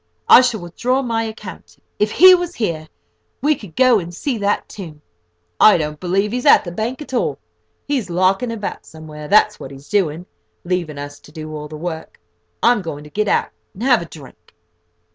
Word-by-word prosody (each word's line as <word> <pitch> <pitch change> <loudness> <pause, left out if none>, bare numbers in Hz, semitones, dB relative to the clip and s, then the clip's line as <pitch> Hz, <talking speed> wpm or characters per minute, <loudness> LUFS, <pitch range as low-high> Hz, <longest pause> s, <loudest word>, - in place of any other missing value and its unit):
I - - +9
shall 240 -5 0
withdraw 245 +10 -1
my 230 -2 -1
account. 220 -1 -8 0.2
If 210 0 +1
he 370 +2 +9
was 355 -1 0
here, 165 -8 -3 0.5
we 295 +4 +2
could 205 - -11
go 255 -3 +5
and 170 -1 -7
see 235 +7 -3
that 205 0 0
tomb. 160 -7 -10 0.6
I 215 - +7
don't 150 -2 -4
believe 195 +3 0
he's 250 +4 -2
at - - +7
the 175 - -6
bank 235 - -4
at 275 - -13
all. 150 - 0 0.5
He's 265 -9 -1
larking 190 +7 +1
about 215 -3 -5
somewhere, 155 -1 -10
that's 210 +3 +4
what - - -8
he's 135 +1 -13
doing, 175 -4 0 0.4
leaving 175 -4 -2
us 145 0 -8
to - - -17
do 155 -1 -8
all 150 0 -6
the 155 0 -9
work. 160 0 -6 0.4
I'm 240 -2 +4
going 150 -4 -6
to 150 - -14
get 210 0 -1
out, - - +1 0.2
and 205 - -7
have 250 -5 +4
a - - -6
drink." 145 -5 -15
190 Hz, 195 wpm, -19 LUFS, 155-235 Hz, 0.6 s, I